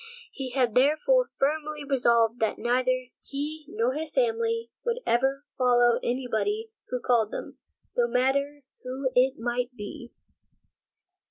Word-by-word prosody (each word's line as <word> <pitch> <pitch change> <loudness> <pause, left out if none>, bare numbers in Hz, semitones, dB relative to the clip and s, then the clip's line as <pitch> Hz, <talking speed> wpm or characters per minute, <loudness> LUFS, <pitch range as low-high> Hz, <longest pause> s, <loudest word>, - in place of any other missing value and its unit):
He 265 -2 -5
had 250 -3 +1
therefore 310 - +3
firmly 300 +1 -1
resolved 235 -4 +3
that 220 - 0
neither 250 +2 +1 0.3
he 300 +2 -5
nor 235 +4 0
his 310 +2 -4
family 460 +1 0
would 475 0 -1
ever 270 +4 +1
follow 245 -1 +4
any 250 +1 -2
body 420 - -1 0.2
who 250 - -2
called 235 -3 +2
them, - - -7 0.4
no 485 -1 +3
matter 280 - 0 0.2
who 260 +1 -3
it 260 +2 +3
might 245 +2 -2
be. 240 +4 -8
265 Hz, 135 wpm, -27 LUFS, 245-305 Hz, 0.4 s, follow